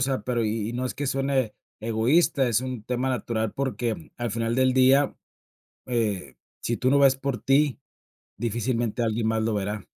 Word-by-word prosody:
sea, 135 Hz, -4 st, 0 dB
pero 120 Hz, -2 st, 0 dB
y 110 Hz, 0 st, -1 dB
y 115 Hz, -, -4 dB
no 125 Hz, +1 st, -2 dB
es 125 Hz, -, -3 dB
que 145 Hz, 0 st, -3 dB
suene 135 Hz, -4 st, 0 dB, 0.2 s
egoísta, 120 Hz, +5 st, +2 dB
es 115 Hz, +1 st, +2 dB
un 130 Hz, -4 st, -5 dB
tema 125 Hz, +3 st, -1 dB
natural 110 Hz, -3 st, -1 dB
porque 120 Hz, -9 st, -3 dB
al 120 Hz, -3 st, -3 dB
final 115 Hz, +1 st, -1 dB
del 130 Hz, 0 st, +3 dB
día, 130 Hz, +2 st, +4 dB, 0.7 s
eh, 105 Hz, -, -2 dB, 0.3 s
si 120 Hz, -, -1 dB
tú 130 Hz, -, +1 dB
no 140 Hz, +1 st, +4 dB
ves 135 Hz, -1 st, +5 dB
por 135 Hz, -2 st, -3 dB
ti, 140 Hz, 0 st, +3 dB, 0.6 s
difícilmente 120 Hz, +1 st, -1 dB
alguien 110 Hz, 0 st, 0 dB
más 110 Hz, 0 st, +1 dB
lo 110 Hz, 0 st, 0 dB
verá. 105 Hz, 0 st, -3 dB
120 Hz, 180 wpm, -25 LUFS, 110-130 Hz, 0.7 s, ves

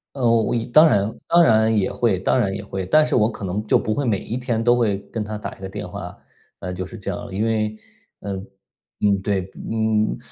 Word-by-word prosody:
呃， 135 Hz, -, -4 dB
我 115 Hz, -1 st, +4 dB
我 -, -, -1 dB
一 115 Hz, -, -1 dB
当 155 Hz, +6 st, +6 dB
然 105 Hz, -3 st, +1 dB
当 170 Hz, 0 st, +5 dB
然 110 Hz, -4 st, +4 dB
也 95 Hz, -, +1 dB
会 115 Hz, -6 st, +1 dB
当 95 Hz, +7 st, +1 dB
然 100 Hz, -5 st, +1 dB
也 100 Hz, +1 st, -5 dB
会， 95 Hz, -1 st, -4 dB
但 155 Hz, +11 st, +4 dB
是 -, -, 0 dB
我 110 Hz, -1 st, +3 dB
可 100 Hz, -, -7 dB
能 100 Hz, +4 st, -3 dB
就 -, -, +5 dB
不 110 Hz, -, -1 dB
会 145 Hz, -, -1 dB
每 110 Hz, -4 st, +2 dB
一 120 Hz, -, -4 dB
天 120 Hz, -3 st, -1 dB
都 120 Hz, +1 st, +4 dB
会 110 Hz, -5 st, +1 dB
跟 110 Hz, -, -2 dB
她 105 Hz, 0 st, -5 dB
打 -, -, -7 dB
一 -, -, -19 dB
个 95 Hz, -, -5 dB
电 -, -, -6 dB
话， -, -, -8 dB, 0.4 s
呃， 90 Hz, -, -5 dB
就 90 Hz, +1 st, -4 dB
是 115 Hz, -, -10 dB
这 100 Hz, -, -4 dB
样。 -, -, -7 dB
因 105 Hz, +4 st, 0 dB
为 110 Hz, -1 st, 0 dB, 0.5 s
嗯， 100 Hz, -1 st, -5 dB, 0.5 s
嗯， 100 Hz, -2 st, +2 dB
对， 100 Hz, -1 st, 0 dB
不 95 Hz, -, -14 dB
嗯 -, -, -7 dB
嗯 110 Hz, -1 st, +1 dB
嗯， -, -, -8 dB
110 Hz, 280 characters per minute, -22 LUFS, 100-115 Hz, 0.5 s, 当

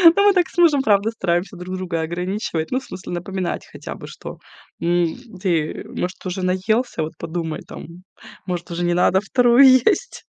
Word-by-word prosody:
Ну 400 Hz, -, +4 dB
мы 400 Hz, -, +6 dB
так 360 Hz, -3 st, +2 dB
с -, -, -18 dB
мужем, 310 Hz, -6 st, +5 dB
правда, 210 Hz, -2 st, +2 dB
стараемся 185 Hz, -2 st, -1 dB
друг 180 Hz, +1 st, -6 dB
друга 175 Hz, -3 st, -3 dB
ограничивать, 175 Hz, 0 st, -3 dB
ну, 255 Hz, -, +1 dB
в -, -, -15 dB
смысле 185 Hz, -1 st, -8 dB
напоминать 180 Hz, +1 st, -3 dB
хотя -, -, -7 dB
бы, -, -, -10 dB
что, -, -, -9 dB, 0.4 s
м 170 Hz, -1 st, +1 dB, 0.3 s
ты, 165 Hz, -5 st, -1 dB
может, 180 Hz, +2 st, -5 dB
уже 185 Hz, +1 st, -3 dB
наелся, 190 Hz, +1 st, 0 dB
вот 155 Hz, -, -5 dB
подумай 165 Hz, -1 st, -4 dB
там, -, -, -9 dB, 0.6 s
может, 175 Hz, -1 st, -4 dB
уже 175 Hz, +1 st, -2 dB
не 175 Hz, 0 st, +2 dB
надо 180 Hz, +2 st, +3 dB
вторую 245 Hz, +5 st, +5 dB
есть. 260 Hz, -, +3 dB
185 Hz, 180 wpm, -21 LUFS, 175-225 Hz, 0.6 s, мы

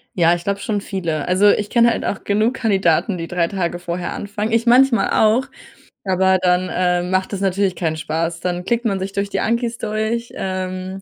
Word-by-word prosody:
Ja, 170 Hz, -1 st, +4 dB
ich 175 Hz, 0 st, -3 dB
glaube 200 Hz, 0 st, -2 dB
schon 205 Hz, -2 st, -2 dB
viele. 170 Hz, -8 st, -3 dB
Also, 185 Hz, +3 st, +4 dB
ich 205 Hz, 0 st, +1 dB
kenne 235 Hz, -1 st, +4 dB
halt -, -, -3 dB
auch 200 Hz, -, -3 dB
genug 215 Hz, +5 st, +1 dB
Kandidaten, 195 Hz, -5 st, +1 dB
die 165 Hz, -1 st, -5 dB
3 175 Hz, -1 st, 0 dB
Tage 175 Hz, -2 st, -2 dB
vorher 175 Hz, 0 st, -4 dB
anfangen. 205 Hz, +2 st, -4 dB
Ich 230 Hz, +1 st, +1 dB
manchmal 245 Hz, 0 st, +4 dB
auch, 220 Hz, +4 st, +3 dB, 0.6 s
aber 190 Hz, 0 st, +3 dB
dann, 180 Hz, 0 st, +2 dB
äh, 180 Hz, -1 st, +1 dB
macht 185 Hz, +2 st, -1 dB
das 195 Hz, -, -3 dB
natürlich 195 Hz, -1 st, 0 dB
keinen 160 Hz, -3 st, -2 dB
Spaß. 165 Hz, +1 st, -2 dB
Dann 180 Hz, 0 st, -3 dB
klickt 235 Hz, +4 st, -1 dB
man 200 Hz, -4 st, 0 dB
sich 190 Hz, +1 st, -4 dB
durch 200 Hz, 0 st, -2 dB
die -, -, -2 dB
Ankis 235 Hz, +1 st, -1 dB
durch, 220 Hz, +2 st, -2 dB
ähm, 185 Hz, 0 st, -4 dB
190 Hz, 200 wpm, -19 LUFS, 180-215 Hz, 0.6 s, Ja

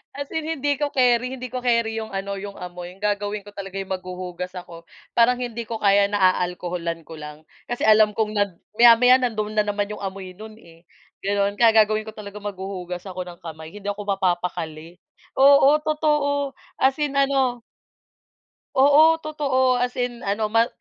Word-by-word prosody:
As 285 Hz, 0 st, -6 dB
in 320 Hz, -1 st, -3 dB
hindi 290 Hz, -3 st, -1 dB
ko 290 Hz, -, +1 dB
keri, 250 Hz, 0 st, +2 dB
hindi 255 Hz, -2 st, -8 dB
ko 255 Hz, -, -3 dB
keri 230 Hz, -2 st, 0 dB
yung 220 Hz, -, -7 dB
ano, 195 Hz, 0 st, -4 dB
yung 200 Hz, 0 st, -8 dB
amoy. 180 Hz, 0 st, -8 dB
Gagawin 205 Hz, 0 st, -2 dB
ko 205 Hz, -, -13 dB
talaga 195 Hz, -1 st, -8 dB
yung 195 Hz, -1 st, -5 dB
maghuhugas 180 Hz, -1 st, -5 dB
ako. 170 Hz, -2 st, -10 dB, 0.2 s
Parang 240 Hz, +1 st, +4 dB
hindi 235 Hz, -2 st, -5 dB
ko 225 Hz, 0 st, -4 dB
kaya 200 Hz, 0 st, +4 dB
na 195 Hz, -2 st, +2 dB
aalkoholan 175 Hz, -2 st, -3 dB
ko 160 Hz, -, -11 dB
lang 150 Hz, +1 st, -10 dB, 0.2 s
kasi 245 Hz, -, -4 dB
alam 215 Hz, -1 st, +5 dB
kong 215 Hz, -1 st, 0 dB
nad 200 Hz, -3 st, 0 dB, 0.2 s
maya-maya 240 Hz, +2 st, +7 dB
nandoon 215 Hz, -4 st, -2 dB
na 210 Hz, -, +3 dB
naman 205 Hz, 0 st, -2 dB
yung 210 Hz, -, -7 dB
amoy 190 Hz, -1 st, -6 dB
no'n 215 Hz, 0 st, -10 dB
eh, 165 Hz, 0 st, -19 dB, 0.4 s
gano'n. 200 Hz, 0 st, 0 dB
Kaya 225 Hz, -2 st, +6 dB
gagawin 215 Hz, +1 st, -2 dB
ko 220 Hz, -, -7 dB
talaga 210 Hz, -1 st, -9 dB
maghuhugas 190 Hz, -3 st, -6 dB
ako 185 Hz, 0 st, -5 dB
ng 175 Hz, -1 st, -11 dB
kamay, 160 Hz, -1 st, -9 dB
hindi 205 Hz, 0 st, -6 dB
ako 205 Hz, 0 st, -5 dB
mapapakali, 175 Hz, -4 st, -2 dB, 0.4 s
oo, 280 Hz, +2 st, +6 dB
totoo, 295 Hz, -2 st, 0 dB, 0.2 s
as 265 Hz, +1 st, +3 dB
in 290 Hz, -2 st, 0 dB
ano. 270 Hz, -3 st, +1 dB, 1.1 s
Oo, 290 Hz, +4 st, +6 dB
totoo 265 Hz, -5 st, +1 dB
as 250 Hz, 0 st, -1 dB
in 245 Hz, -1 st, -2 dB
ano, 210 Hz, +2 st, -1 dB
ma 230 Hz, +1 st, +4 dB
210 Hz, 175 wpm, -23 LUFS, 185-250 Hz, 1.1 s, maya-maya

